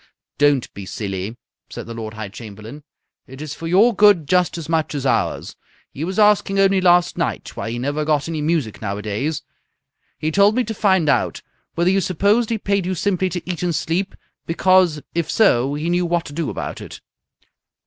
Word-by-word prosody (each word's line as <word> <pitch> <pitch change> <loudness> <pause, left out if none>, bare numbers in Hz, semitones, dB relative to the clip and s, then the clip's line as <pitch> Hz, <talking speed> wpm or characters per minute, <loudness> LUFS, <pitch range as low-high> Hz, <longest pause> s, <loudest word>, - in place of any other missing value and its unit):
"Don't 145 -3 +2
be 100 - -8
silly!" 100 +2 -5 0.3
said - - -7
the 115 - -7
Lord 110 -1 -7
High 110 -2 -6
Chamberlain. 110 +6 -10 0.4
"It's 140 +3 -7
for 165 - -7
your 205 +8 +4
good 205 -8 +5
just 180 -2 +2
as 165 -3 -6
much 160 -2 -1
as 140 -2 -3
ours. - - -1 0.4
He 145 - -6
was 185 +3 -4
asking 205 -2 +3
only 195 -1 +4
last 175 -1 +3
night - - -3
why - - -4
he 120 - -4
never 145 +5 -2
got 150 -1 0
any 160 -2 -3
music 150 -8 -1
nowadays. 105 +9 -3 0.7
He 155 - -2
told 200 +5 +4
me 250 - +2
to 225 - -4
find 190 -6 +2
out 140 - +1 0.3
whether 175 +2 +2
you 195 0 +2
supposed 200 +6 +1
he 230 - 0
paid 200 -3 -1
you 185 - -1
simply 185 +1 0
to 175 -1 -6
eat 180 -2 -3
and 175 -2 0
sleep, 170 +5 -2 0.3
because 175 -2 +3
if 165 -2 -1
so 135 - +3
he 150 +3 -3
knew 175 0 +1
what 170 0 0
to 145 - -9
do 165 0 -2
about - - -5
it." - - -9
165 Hz, 190 wpm, -20 LUFS, 140-190 Hz, 0.7 s, good